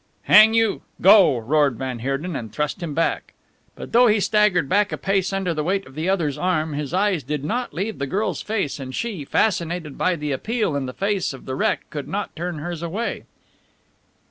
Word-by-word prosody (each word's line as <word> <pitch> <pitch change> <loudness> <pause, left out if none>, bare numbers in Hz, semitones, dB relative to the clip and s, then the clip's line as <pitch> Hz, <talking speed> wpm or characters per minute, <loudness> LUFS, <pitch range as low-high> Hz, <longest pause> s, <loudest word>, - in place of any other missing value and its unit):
"Hang 220 +1 +7
you! 225 -2 +2 0.2
Go!" 190 - +6
roared 140 +3 +2
van 130 -1 -4
Heerden, 135 +7 -3
and 110 -5 -5
thrust 150 - -3
him 160 -4 -4
back. 165 - -1 0.4
But - - -9
though 245 +1 +6
he 210 -1 +3
staggered 205 -6 +2
back 205 +6 +2
a - - -3
pace 195 0 0
under 195 -3 -1
the 155 -1 -2
weight 195 +4 -1
of 130 - -14
the 160 +5 -2
other's 165 -8 0
arm, 160 -4 0
his 145 -1 -4
eyes 190 -2 +1
did 145 +1 -4
not 240 +7 -2
leave 200 +3 -4
the 140 - -2
girl's 205 +9 -1
face, 205 -10 -2
and 130 -1 -6
she, 215 -10 -3
fascinated 170 -3 -1
by 185 - +2
the 150 -2 -4
appeal 215 - -1
in 135 -2 -2
the 125 - -6
face 200 -3 -1
of 135 - -11
the 130 - -4
wreck, 130 - -1
could 145 -2 -5
not 205 +1 -4
turn 175 0 -4
hers 170 +2 -5
away. 185 +8 -4
170 Hz, 205 wpm, -22 LUFS, 145-200 Hz, 0.4 s, Hang